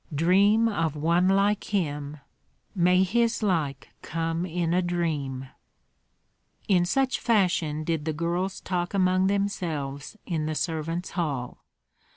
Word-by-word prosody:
"Dream 200 +8 +4
of 165 -8 -1
one 170 +4 +2
like 200 +2 +2
him!" 150 -7 -2 0.6
"May 180 -1 +4
his 230 +4 +1
like 160 -9 -1
come 165 +2 -2
in 170 -1 -1
a 180 - +3
dream!" 150 -7 -2 1.2
In 180 -3 +3
such 265 +7 +1
fashion 175 -9 +1
did 160 -2 -2
the 160 - 0
girls 175 +4 -2
talk 180 +1 -2
among 185 0 +3
themselves 170 -6 -2
in 160 -4 -2
the 155 - -2
servants' 165 +2 -2
hall. 140 -9 -3
175 Hz, 125 wpm, -26 LUFS, 155-190 Hz, 1.2 s, Dream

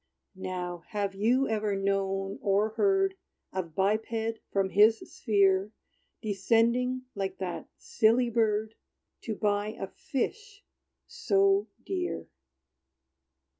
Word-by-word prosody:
Now, 180 -2 -5
have 205 -3 -2
you 240 +7 +2
ever 215 -2 0
known 195 0 -1
or 205 +1 +2
heard 385 - +2 0.4
Of 170 -4 -4
biped, 220 +3 0
from 195 -1 +1
his 215 +3 +6
sphere 200 -1 +1 0.5
Descending, 230 +5 +1
like 195 -1 -3
that 185 -2 -5
silly 235 +2 +2
bird 220 -1 +1 0.5
To 220 - -2
buy 205 0 0
a - - -2
fish 405 - -4 0.4
so 400 -4 +2 0.2
dear? 360 -2 -3
215 Hz, 100 wpm, -29 LUFS, 195-240 Hz, 0.5 s, his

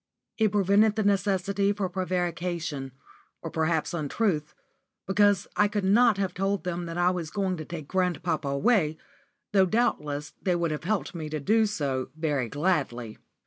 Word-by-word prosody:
It 215 -2 +3
prevented 205 +1 +3
the 220 - 0
necessity 200 0 +1
for 200 -2 -2
prevarication, 175 -5 -2 0.5
or 165 - -5
perhaps 160 0 0
untruth, 155 0 -1 0.5
because 205 +1 +3
I 210 - +4
could 205 -1 -2
not 220 +3 +4
have 190 -2 -1
told 195 +2 -1
them 175 -1 -3
that 165 +1 -5
I 175 +1 +3
was 175 -4 -4
going 190 -1 -1
to 155 - -6
take 160 -3 -7
grandpapa 175 -4 -1
away, 155 - +2 0.5
though 190 -2 +4
doubtless 150 -10 -1
they 180 -2 +1
would 170 -2 0
have 150 +1 -4
helped 215 +1 -1
me 160 -3 -5
to 155 0 -3
do 220 +9 +3
so 140 -10 -2
very 145 -7 -1
gladly. 140 -8 -1
180 Hz, 160 wpm, -27 LUFS, 155-200 Hz, 0.5 s, I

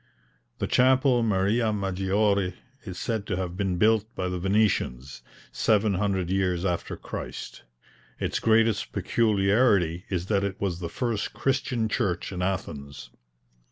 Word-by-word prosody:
The - - -2
chapel 130 0 +4
Maria 110 +2 +1
Maggiore, 100 -1 0 0.3
is 95 -3 -7
said 110 -3 -3
to - - -1
have 90 -1 -3
been 95 -2 -1
built 110 +2 +3
by 90 -1 -2
the 90 0 -3
Venetians, 90 - 0 0.3
700 100 -4 +1
years 95 -2 0
after 90 -2 -2
Christ. - - -7 0.6
Its - - -1
greatest 115 -2 +2
peculiarity 100 -5 +2
is 90 -2 -2
that 100 0 +1
it 100 +1 -3
was 95 -4 -2
the 85 -2 -4
first 120 -5 -2
Christian 130 -4 0
church 100 -6 -1
in 90 -1 -4
Athens. 70 -7 -4
100 Hz, 130 wpm, -26 LUFS, 90-110 Hz, 0.6 s, chapel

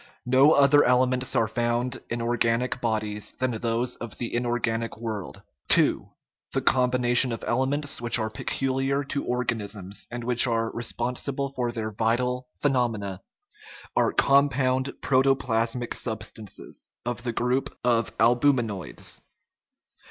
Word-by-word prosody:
No 130 +5 +5
other 145 +1 +6
elements 125 +1 +2
are 115 -3 +3
found 120 +2 -1
in 115 0 -2
organic 120 +1 0
bodies 105 -2 -2
than 130 0 -1
those 115 +2 -2
of 120 - -8
the 120 - -4
inorganic 120 -2 -1
world. 110 -4 -6 0.3
II. - - +2 0.5
The - - +1
combinations 125 -1 +3
of 115 - -6
elements 135 +3 0
which 120 0 +3
are 110 -1 -2
pecu 135 +4 -2
liar 135 +2 0
to 140 0 -3
organisms, 105 -5 -3
and 120 0 -6
which 125 +1 +4
are 115 -1 0
responsible 125 +4 -3
for 125 -3 -1
their 110 -2 -4
vital 125 +4 0 0.2
phenomena, 115 -8 0 0.7
are - - +3
compound 135 -2 +3
protoplasmic 125 -3 +1
sub 110 -3 -2
stances, 105 -2 -8 0.2
of 120 0 -3
the 120 0 -2
group 125 +3 -1
of 120 -3 +1
albuminates. 120 -4 +1
120 Hz, 130 wpm, -26 LUFS, 115-130 Hz, 0.7 s, other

